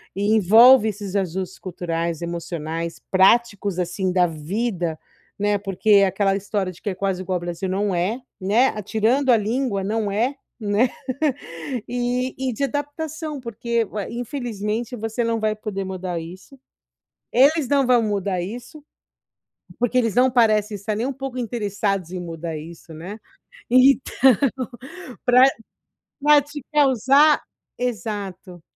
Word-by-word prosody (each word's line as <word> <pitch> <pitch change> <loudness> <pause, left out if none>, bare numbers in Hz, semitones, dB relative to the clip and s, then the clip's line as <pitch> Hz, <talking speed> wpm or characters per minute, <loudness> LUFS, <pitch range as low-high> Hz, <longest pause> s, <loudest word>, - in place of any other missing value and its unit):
e 205 +2 +1
envolve 220 +4 +7
esses 205 -2 -5
ajustes 190 -1 -2
culturais, 170 -2 -3
emocionais, 170 -1 -4
práticos, 200 0 +3
assim, 180 +1 -1
da 180 -1 +3
vida, 170 +1 -3 0.4
né. 205 0 +1
Porque 200 +1 +3
aquela 195 0 +1
história 195 -1 -2
de 175 - -17
que 205 - -3
é 185 - -4
quase 190 -1 -2
igual 185 -1 -2
o - - -5
Brasil, 175 +2 -4
não 195 +1 0
é, 195 +9 -1 0.2
né. 215 +8 +3
A 210 - -5
tirando 230 +7 +1
a 230 - +6
língua, 215 -2 -1
não 210 0 -1
é, 240 +7 0 0.2
né, 215 +4 +2 1.0
e 245 +1 -1
e 260 -1 -2
de 280 +5 -3
adaptação 295 +2 -4
porque 235 0 -1
ué, 205 -1 -5
infelizmente 235 -2 -4
você 225 +1 -3
não 230 -1 0
vai 215 0 0
poder 205 -2 -4
mudar 185 -2 -4
isso. 185 +11 -11 0.7
Eles 280 +3 +4
não 275 -3 +3
vão 245 -2 +4
mudar 200 -3 -1
isso, 245 - -8 1.0
porque 245 +1 +1
eles 230 -4 +1
não 255 +1 +4
parecem 215 -3 +2
estar 210 +2 -3
nem 230 - -1
um 275 - -2
pouco 270 -1 -6
interessados 205 -6 -2
em 180 - -4
mudar 165 -1 -5
isso, 160 +1 -10
né. 185 +7 -8 0.5
Então, 255 0 +4 1.0
pra 250 0 +6 0.8
pra 295 0 +6
te 290 -1 -9
causar 280 +1 +4 0.4
exato. 205 -7 -5
210 Hz, 140 wpm, -22 LUFS, 185-245 Hz, 1.0 s, envolve